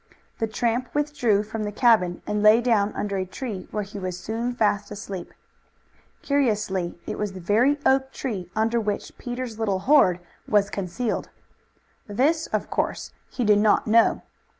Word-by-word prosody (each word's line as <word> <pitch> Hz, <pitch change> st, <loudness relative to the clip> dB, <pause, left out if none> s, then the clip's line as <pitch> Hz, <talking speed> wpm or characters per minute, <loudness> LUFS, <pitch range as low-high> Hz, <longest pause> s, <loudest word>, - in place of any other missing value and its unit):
The 225 Hz, -, 0 dB
tramp 235 Hz, +3 st, -1 dB
withdrew 250 Hz, -9 st, +1 dB
from 220 Hz, +1 st, -5 dB
the 210 Hz, -, -3 dB
cabin 210 Hz, -6 st, +3 dB
and 210 Hz, 0 st, -1 dB
lay 215 Hz, +2 st, +7 dB
down 220 Hz, -4 st, +2 dB
under 200 Hz, -1 st, -2 dB
a 190 Hz, -, 0 dB
tree, 200 Hz, -2 st, -6 dB
where 210 Hz, -, -2 dB
he 200 Hz, +1 st, -8 dB
was 185 Hz, -1 st, -4 dB
soon 230 Hz, +5 st, -3 dB
fast 205 Hz, -3 st, +1 dB
asleep. 195 Hz, -4 st, -7 dB, 0.9 s
Curiously 210 Hz, -11 st, 0 dB
it -, -, -5 dB
was 210 Hz, -2 st, -2 dB
the 190 Hz, -, -8 dB
very 225 Hz, +11 st, +3 dB
oak 265 Hz, 0 st, +3 dB
tree 200 Hz, -12 st, -4 dB
under 225 Hz, +2 st, +1 dB
which 210 Hz, -1 st, -3 dB
Peter's 245 Hz, -2 st, -5 dB
little 205 Hz, -4 st, 0 dB
hoard 255 Hz, -12 st, +5 dB, 0.3 s
was 205 Hz, -1 st, +2 dB
concealed. 200 Hz, +5 st, -3 dB, 0.8 s
This 285 Hz, +10 st, +1 dB
of -, -, -2 dB
course -, -, -2 dB, 0.2 s
he 250 Hz, -, -3 dB
did 210 Hz, -1 st, +5 dB
not 210 Hz, 0 st, +3 dB
know. 230 Hz, +1 st, +3 dB
215 Hz, 160 wpm, -24 LUFS, 200-245 Hz, 0.9 s, lay